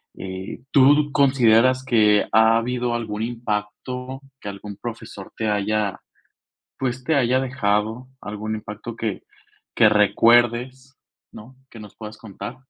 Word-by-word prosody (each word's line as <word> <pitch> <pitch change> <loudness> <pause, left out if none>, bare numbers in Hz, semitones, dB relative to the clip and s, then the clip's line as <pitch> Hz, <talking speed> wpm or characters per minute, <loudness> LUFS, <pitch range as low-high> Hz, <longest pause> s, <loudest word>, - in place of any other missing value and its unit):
Eh, 95 0 -7
¿tú 145 +3 +5
consideras 130 -2 +4
que, 105 -4 +3
ha 110 +1 +5
habido 120 0 -2
algún 110 -2 -3
impacto 120 +3 -4 0.2
que 100 - -7
algún 100 0 -9
profesor 110 -4 -8
te 110 - -2
haya, 105 -1 -1 0.8
pues 130 -1 -3
te 160 - +1
haya 130 -2 +2
dejado 115 -1 -1
algún 105 +1 -5
impacto 110 +2 -8
que, 110 -4 -4 0.5
que 110 - +6
recuerdes, 120 +5 +2 0.3
no? 120 +5 -13 0.2
¿Que 115 - -12
nos 105 -2 -12
puedas 110 -1 -9
contar? 105 +2 -8
115 Hz, 130 wpm, -22 LUFS, 105-125 Hz, 0.8 s, que